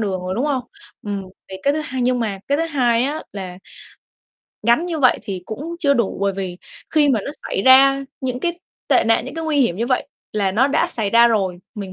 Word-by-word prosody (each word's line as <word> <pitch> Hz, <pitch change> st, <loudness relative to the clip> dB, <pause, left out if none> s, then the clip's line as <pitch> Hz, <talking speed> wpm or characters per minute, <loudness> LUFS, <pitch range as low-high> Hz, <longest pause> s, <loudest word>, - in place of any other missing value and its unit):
đường 195 Hz, -4 st, -1 dB
rồi, 185 Hz, +1 st, -3 dB
đúng 245 Hz, -, -1 dB
không? 265 Hz, -4 st, 0 dB, 0.4 s
Ừm, 200 Hz, -1 st, -4 dB, 0.3 s
thì 190 Hz, -, -7 dB
cái 280 Hz, -, +3 dB
thứ 310 Hz, -, -1 dB
hai 260 Hz, -4 st, -3 dB
nhưng 250 Hz, 0 st, +2 dB
mà 210 Hz, -4 st, -2 dB
cái 285 Hz, +2 st, +2 dB
thứ 330 Hz, -, +1 dB
hai 245 Hz, -6 st, +2 dB
á 295 Hz, +3 st, -2 dB
là 185 Hz, -3 st, -7 dB, 1.0 s
gắn 235 Hz, +10 st, +3 dB
như 335 Hz, -3 st, -3 dB
vậy 255 Hz, -4 st, +4 dB
thì 190 Hz, -4 st, -5 dB
cũng 310 Hz, +10 st, -6 dB
chưa 280 Hz, -4 st, +3 dB
đủ 235 Hz, -6 st, 0 dB
bởi 200 Hz, 0 st, +1 dB
vì 185 Hz, -2 st, -5 dB, 0.3 s
khi 300 Hz, -2 st, +4 dB
mà 235 Hz, -6 st, +2 dB
nó -, -, -4 dB
xảy 195 Hz, -, -2 dB
ra 270 Hz, +2 st, +6 dB, 0.2 s
những 255 Hz, -1 st, -3 dB
cái 345 Hz, +2 st, -2 dB, 0.3 s
tệ -, -, +4 dB
nạn, 225 Hz, 0 st, +2 dB
những 260 Hz, -, -8 dB
cái 325 Hz, 0 st, -4 dB
nguy 300 Hz, -3 st, +1 dB
hiểm 185 Hz, -9 st, +2 dB
như 230 Hz, -, -1 dB
vậy 255 Hz, 0 st, 0 dB, 0.2 s
là 200 Hz, -3 st, 0 dB
nó 240 Hz, +7 st, +3 dB
đã 285 Hz, +4 st, +2 dB
xảy 215 Hz, -8 st, -2 dB
ra 235 Hz, +1 st, +6 dB
rồi, 190 Hz, -5 st, 0 dB, 0.2 s
mình 195 Hz, -4 st, -6 dB
240 Hz, 235 wpm, -20 LUFS, 200-280 Hz, 1.0 s, ra